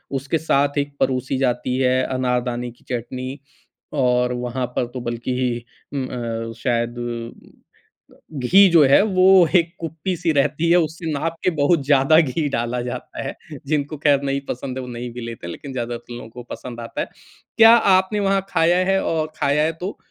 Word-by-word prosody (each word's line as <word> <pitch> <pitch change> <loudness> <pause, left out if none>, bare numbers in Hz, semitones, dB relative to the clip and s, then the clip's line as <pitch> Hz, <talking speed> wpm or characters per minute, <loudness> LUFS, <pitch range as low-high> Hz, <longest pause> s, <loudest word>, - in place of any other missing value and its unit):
उसके 140 +4 -1
साथ 145 -2 +1
एक 145 0 -2
परोसी 130 0 0
जाती 125 -1 0
है 130 0 +2
अनारदाने 125 -1 -1
की 120 - -24
चटनी 130 +3 -5 0.5
और 125 -3 +2
वहाँ 125 +1 -3
पर 125 - +1
तो 130 - -5
बल्कि 120 0 -2 0.3
उम, 135 -2 -2
अ, 115 -2 -4
शायद 120 0 -1 0.5
घ - - -19 0.8
घी 180 +9 +5
जो 165 -3 +6
है, 135 - +6
वो 185 -3 +5
एक 170 -1 +3
कुप्पी-सी 165 +1 -2
रहती 155 +4 +1
है, 175 - +6
उससे 160 0 -1
नाप 160 +3 -2
के - - +3
बहुत 150 -1 +2
ज़्यादा 145 +2 +5
घी 150 +1 -1
डाला 120 -1 -2
जाता 120 0 -6
है। - - -5 0.3
जिनको 150 0 -1
खैर 140 -1 +4
नहीं 140 0 -1
पसंद 130 +1 -4
है, - - -3
वो - - -8
नहीं 120 0 -6
भी 125 - -7
लेते 115 -6 -7
हैं - - -5
लेकिन 135 - -8
ज़्यादातर 120 -1 -5
लोगों 120 - -9
को 120 +2 -10
पसंद 120 -2 -8
आता 115 - -5
है। - - -3 0.5
क्या 225 0 +9 0.2
आपने 190 +3 +1
वहाँ 195 -1 +1
खाया 170 0 +3
है 195 - +2
और 155 -1 -1
खाया 145 +2 +2
है 160 - +1
तो 190 +3 -4
135 Hz, 180 wpm, -21 LUFS, 125-160 Hz, 0.8 s, क्या